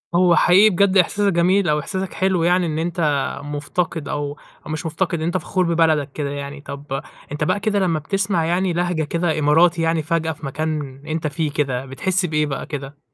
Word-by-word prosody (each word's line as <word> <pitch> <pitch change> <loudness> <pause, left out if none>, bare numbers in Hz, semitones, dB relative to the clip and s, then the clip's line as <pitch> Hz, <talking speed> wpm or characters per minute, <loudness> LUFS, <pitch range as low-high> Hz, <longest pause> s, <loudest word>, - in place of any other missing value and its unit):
هو 175 -1 +5
حقيقي 195 +4 +6
بجد 195 +1 +3
إحساسك 200 +2 +2
جميل 180 +1 +3
أو 150 - +2
إحساسك 190 +5 -4
حلو 185 -3 +1
يعني 180 +1 +3
إن 155 -1 -2
أنت 170 +1 -3 0.4
مُفتقِد 150 +2 -3
أو 145 0 -3 0.3
أو - - -6
مش 155 +2 -4
مُفتقِد، 170 +1 -1
إن 160 - -2
أنت 175 +2 0
فخور 185 0 -1
ببلدك 155 -4 +2
كده، 145 0 -3
يعني 140 0 -6
طَب 140 -1 -6 0.3
أنت 150 +1 -2
بقى 205 - +1
كده 205 -2 0
لمّا 170 -5 +1
بتسمع 190 +1 0
يعني 180 +2 +1
لهجة 175 -2 0
كده 165 +1 -1
إماراتي 165 +3 +4
يعني 165 0 +1
فجأة 160 0 0
في 150 -1 -9
مكان 145 -1 -3
أنت 155 0 -2
فيه 150 0 -2
كده، 135 -3 -1
بتحس 180 +8 0
بإيه 155 -2 +1
بقى 140 -2 -4
كده؟ 145 -1 -7
160 Hz, 195 wpm, -21 LUFS, 150-180 Hz, 0.4 s, حقيقي